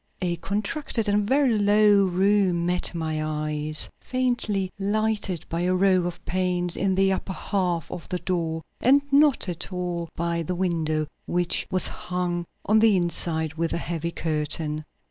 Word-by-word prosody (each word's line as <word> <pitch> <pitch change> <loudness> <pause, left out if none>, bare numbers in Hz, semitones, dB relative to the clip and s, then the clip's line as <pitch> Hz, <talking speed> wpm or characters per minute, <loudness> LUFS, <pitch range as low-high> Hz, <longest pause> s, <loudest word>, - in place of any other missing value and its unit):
A 175 -2 -1
contracted 215 - -2
and 205 0 +1
very 265 -4 +3
low 205 -1 +5
room 185 -1 +2
met 180 0 -1
my 155 -2 -2
eyes, 150 0 -1
faintly 240 -7 -1
lighted 205 -3 -1
by 165 +1 -2
a 180 +1 +1
row 185 -1 +3
of 175 - -8
panes 180 -1 -1
in 190 0 0
the 195 0 +3
upper 190 0 -4
half 180 -5 -2
of 175 - -7
the 180 - -1
door 165 -3 -2 0.2
and 275 +3 +4
not 285 -6 +4
at 175 +2 -5
all 175 -2 -3
by 170 0 -1
the 180 +3 -3
window, 160 -4 0 0.2
which 175 0 +1
was 185 - +5
hung 175 -1 -3 0.2
on 215 +1 +4
the 215 -3 +5
inside 165 -2 0
with 165 0 -2
a - - 0
heavy 170 -1 -3
curtain. 155 -1 -1
180 Hz, 160 wpm, -25 LUFS, 170-200 Hz, 0.2 s, low